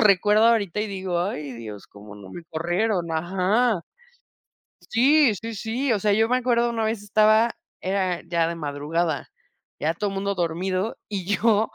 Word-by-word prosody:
lo -, -, +4 dB
recuerdo 210 Hz, +2 st, +5 dB
ahorita, 210 Hz, -4 st, +2 dB
y 215 Hz, -, -1 dB
digo: 190 Hz, -3 st, -2 dB
"Ay, 150 Hz, -7 st, -3 dB
Dios, 110 Hz, -4 st, -9 dB
cómo 105 Hz, 0 st, -13 dB
no 100 Hz, -2 st, -12 dB
me 170 Hz, -, -8 dB
corrieron". 175 Hz, +2 st, -1 dB
Ajá. 185 Hz, +6 st, +1 dB, 1.1 s
Sí, 265 Hz, 0 st, +4 dB
sí, 225 Hz, +3 st, -6 dB
sí. 235 Hz, +5 st, -1 dB
O 210 Hz, -, 0 dB
sea, 210 Hz, 0 st, +2 dB
yo 220 Hz, +2 st, +3 dB
me 250 Hz, +2 st, +2 dB
acuerdo, 240 Hz, -1 st, +2 dB
una 225 Hz, -1 st, -1 dB
vez 220 Hz, -1 st, -2 dB
estaba 215 Hz, +2 st, +4 dB, 0.3 s
era 185 Hz, -2 st, -1 dB
ya 170 Hz, -1 st, +1 dB
de 170 Hz, -, -3 dB
madrugada, 155 Hz, +1 st, -2 dB, 0.5 s
ya 160 Hz, +2 st, 0 dB
todo 205 Hz, +5 st, -2 dB
mundo 195 Hz, +1 st, -2 dB
dormido, 185 Hz, +4 st, -2 dB
y 195 Hz, -4 st, -4 dB
yo, 210 Hz, +2 st, +2 dB
195 Hz, 170 wpm, -24 LUFS, 170-220 Hz, 1.1 s, recuerdo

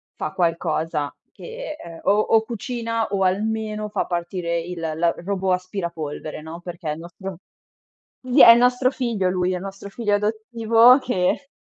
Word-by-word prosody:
fa 155 Hz, -, -4 dB
qualcosa 165 Hz, -3 st, -1 dB, 0.2 s
che 480 Hz, -7 st, -8 dB
ehm, 165 Hz, -1 st, -10 dB
o -, -, +2 dB
o 220 Hz, +1 st, +4 dB
cucina 230 Hz, -1 st, -3 dB
o 195 Hz, -1 st, -1 dB
almeno 215 Hz, +2 st, -1 dB
fa -, -, -1 dB
partire 170 Hz, -1 st, -2 dB
il 170 Hz, +1 st, -6 dB
l 165 Hz, +1 st, 0 dB
robot 190 Hz, -1 st, 0 dB
aspirapolvere, 170 Hz, -5 st, -4 dB
no, 160 Hz, +2 st, -9 dB
perché 175 Hz, -2 st, -6 dB
è -, -, 0 dB
il 155 Hz, -, -8 dB
nostro 185 Hz, +1 st, -8 dB, 0.8 s
sì, 255 Hz, +2 st, +4 dB
è -, -, +11 dB
il 230 Hz, -, +8 dB
nostro 250 Hz, +1 st, +3 dB
figlio 235 Hz, -8 st, -1 dB
lui 180 Hz, 0 st, 0 dB
è -, -, -1 dB
il 180 Hz, -, -6 dB
nostro 195 Hz, 0 st, -8 dB
figlio 210 Hz, 0 st, -1 dB
adottivo 225 Hz, +3 st, +4 dB
che 245 Hz, +2 st, -1 dB
195 Hz, 165 wpm, -22 LUFS, 170-230 Hz, 0.8 s, è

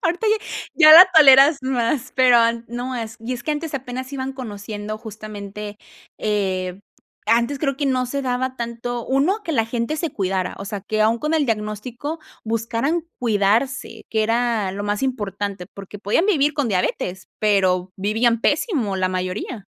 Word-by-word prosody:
ahorita 350 Hz, +6 st, 0 dB
ya 435 Hz, +1 st, +3 dB, 0.5 s
ya -, -, +12 dB
la 350 Hz, +4 st, +11 dB
toleras 280 Hz, -1 st, +8 dB
más, 255 Hz, 0 st, -1 dB
pero 255 Hz, -2 st, +6 dB
an 230 Hz, 0 st, +1 dB
no, 245 Hz, +2 st, -4 dB
es 225 Hz, -2 st, -5 dB
y 230 Hz, +3 st, -4 dB
es 240 Hz, -, -8 dB
que 305 Hz, -, -3 dB
antes 300 Hz, 0 st, -4 dB
apenas 260 Hz, 0 st, -5 dB
iban 265 Hz, 0 st, -4 dB
conociendo 210 Hz, -4 st, -6 dB
justamente, 210 Hz, -1 st, -8 dB, 0.4 s
eh, 190 Hz, -3 st, -2 dB, 0.5 s
antes 235 Hz, +5 st, +2 dB
creo 275 Hz, -3 st, 0 dB
que 285 Hz, 0 st, -1 dB
no 255 Hz, -1 st, +1 dB
se 280 Hz, +3 st, -3 dB
daba 260 Hz, 0 st, -2 dB
tanto, 235 Hz, 0 st, -4 dB
1 310 Hz, +11 st, +1 dB
que 330 Hz, -, -3 dB
la 225 Hz, -6 st, +1 dB
gente 235 Hz, +6 st, -2 dB
se 330 Hz, 0 st, -2 dB
cuidara, 190 Hz, -2 st, -2 dB
o 195 Hz, -, -6 dB
sea, 205 Hz, 0 st, -5 dB
que 215 Hz, +2 st, -3 dB
aún 225 Hz, +2 st, +2 dB
con 305 Hz, +5 st, -1 dB
el 310 Hz, -2 st, +2 dB
diagnóstico 230 Hz, +6 st, -4 dB, 0.3 s
buscaran 230 Hz, +8 st, -1 dB
cuidarse, 225 Hz, +2 st, 0 dB
que 220 Hz, -1 st, +1 dB
era 230 Hz, -4 st, 0 dB
lo 200 Hz, +1 st, -5 dB
más 205 Hz, +2 st, -2 dB
importante, 205 Hz, -7 st, -3 dB
porque 200 Hz, +1 st, -10 dB
podían 210 Hz, -, +1 dB
vivir 300 Hz, -7 st, +2 dB
con 285 Hz, -4 st, 0 dB
diabetes, 185 Hz, -1 st, -2 dB
pero 185 Hz, -3 st, +1 dB
vivían 225 Hz, +4 st, +1 dB
pésimo 275 Hz, -, 0 dB
la 185 Hz, 0 st, +1 dB
mayoría. 185 Hz, +4 st, -4 dB
230 Hz, 170 wpm, -21 LUFS, 205-265 Hz, 0.5 s, ya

